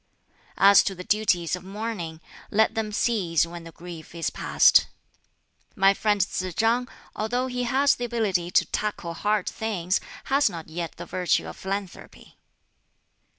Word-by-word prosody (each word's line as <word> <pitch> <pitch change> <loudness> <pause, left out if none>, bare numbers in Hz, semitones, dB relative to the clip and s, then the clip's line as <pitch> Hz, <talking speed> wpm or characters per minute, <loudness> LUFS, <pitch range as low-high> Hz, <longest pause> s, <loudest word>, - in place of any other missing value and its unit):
"As 200 0 +7
to 195 - -2
the 180 - -8
duties 185 -5 +1
of 180 - -10
mourning, 190 -5 -5 0.3
let 220 +1 +3
them 220 -1 -2
cease 195 -8 +1
when 170 0 -9
the 165 - -10
grief 170 -1 -11
is 165 - -2
past. - - +4 0.9
"My 195 -2 +5
friend 205 0 +1
Tsz 185 -2 -1
chang, 235 +3 +2 0.3
although 245 +4 -1
he 250 -1 -2
has 270 +3 +3
the 245 - -4
ability 205 -7 0
to - - +3
tackle 200 -5 -3
hard 205 +3 0
things, 190 -5 -1 0.2
has 275 +2 +2
not 165 -2 -8
yet 165 +1 -5
the - - -9
virtue 180 -2 0
of - - -8
philanthropy." 195 -1 -7
195 Hz, 150 wpm, -25 LUFS, 175-220 Hz, 0.9 s, As